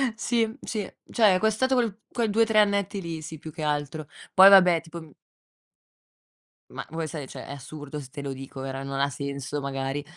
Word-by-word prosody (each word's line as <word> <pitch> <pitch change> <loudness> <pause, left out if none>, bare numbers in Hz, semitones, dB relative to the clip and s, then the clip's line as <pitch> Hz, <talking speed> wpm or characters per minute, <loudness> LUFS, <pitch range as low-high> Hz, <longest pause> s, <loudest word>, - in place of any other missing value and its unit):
Sì, 230 +1 0
sì. 215 -2 -3 0.3
Cioè, 210 -5 +5
è - - +1
costato 220 +5 +2
quel 225 -4 0
quei 230 -3 0
2, 225 +2 +3
3 220 -1 +3
annetti 200 -1 +2
lì. 165 -2 -5
Sì, 160 +1 -8
più 155 +1 -9
che 160 - -9
altro, 150 0 -2 0.3
poi 190 +1 +10
vabbè, 180 -4 +7
tipo 170 +1 -9 1.7
Ma - - -6
vuoi 160 0 -3
sai, 150 -4 -6
cioè, - - -9
è - - -11
assurdo 145 +1 -8
se 135 - -10
te 145 +1 -8
lo 140 -1 -4
dico, 135 0 -8
vero, 135 0 -5
non 135 0 -4
ha 140 +1 +1
senso 140 +1 -4
magari, 135 +1 -3
160 Hz, 195 wpm, -26 LUFS, 140-205 Hz, 1.7 s, poi